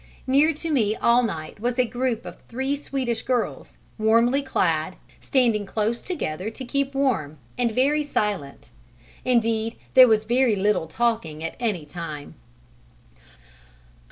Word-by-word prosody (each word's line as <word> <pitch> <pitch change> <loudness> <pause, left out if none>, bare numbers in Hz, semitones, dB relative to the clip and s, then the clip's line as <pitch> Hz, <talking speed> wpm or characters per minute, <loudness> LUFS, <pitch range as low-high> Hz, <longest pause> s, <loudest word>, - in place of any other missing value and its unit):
Near 280 +4 +4
to 320 +2 -5
me 220 -7 +2
all 235 +2 +4
night 165 -8 -4
was 240 +3 -1
a 255 - +3
group 245 -1 -2
of - - -10
three 265 +4 -2
Swedish 265 -4 -3
girls, 250 -3 -2 0.2
warmly 230 +5 +3
clad, 175 - 0 0.2
standing 235 -6 +2
close 220 +3 -1
together 200 - -3
to 255 +4 -8
keep 280 +2 -1
warm, 220 - 0 0.2
and 245 -1 +1
very 280 +6 +2
silent; 205 - -3 0.5
indeed 230 -2 +1 0.2
there 255 -1 +9
was 220 -2 +3
very 240 0 +2
little 195 -4 +1
talking 195 -8 -1
at 165 - -4
any 210 -10 -1
time. 150 -2 -7
230 Hz, 135 wpm, -24 LUFS, 205-260 Hz, 0.5 s, there